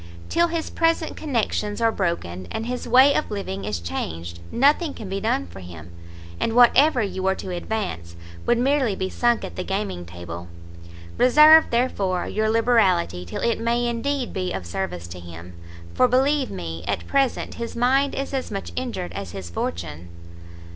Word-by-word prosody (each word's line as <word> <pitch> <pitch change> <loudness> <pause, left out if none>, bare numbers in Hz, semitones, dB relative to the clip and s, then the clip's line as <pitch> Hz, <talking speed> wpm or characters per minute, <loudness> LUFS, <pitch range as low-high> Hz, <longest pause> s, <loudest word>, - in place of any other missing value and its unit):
Till 340 0 +3
his 335 -1 -3
present 330 -1 +1
connections 225 -7 -1
are 230 -1 +3
broken, 95 - -3
and 225 - -4
his 250 +1 -4
way 260 +4 +6
of - - -1
living 100 - -4
is 105 -4 -2
changed, 85 0 -5
nothing 290 +4 +3
can 215 - -7
be 195 +1 -3
done 90 - 0
for 90 +2 -11
him, 85 -2 -11 0.5
and 225 - 0
whatever 245 +2 +5
you 195 -2 -4
were 190 0 +1
to 185 - -6
advance, 175 - -4 0.3
would 240 - +4
merely 260 -4 +2
be 190 0 -3
sunk 240 -1 +1
at - - -9
the 185 - -2
gaming 195 - -3
table. 85 0 -8 0.7
Reserve, 305 +5 +8
therefore, 200 -7 0
your 215 0 0
liberality 195 - +2
till 85 - -6
it 235 -1 +1
may 235 +1 0
indeed 245 +2 -2
be 185 -2 -2
of 90 - -4
service 85 0 -4
to 90 +1 -8
him, 85 0 -10 0.4
for 255 - +4
believe 265 +2 +2
me, 85 -2 -6
at - - -2
present, 275 -3 0
his 230 - -5
mind 265 +4 +2
is 275 +1 -4
as 265 -1 -2
much 195 -2 -5
injured 235 - -4
as 95 -2 -6
his 95 -3 -7
fortune." 85 0 -4
210 Hz, 175 wpm, -23 LUFS, -, 0.7 s, Reserve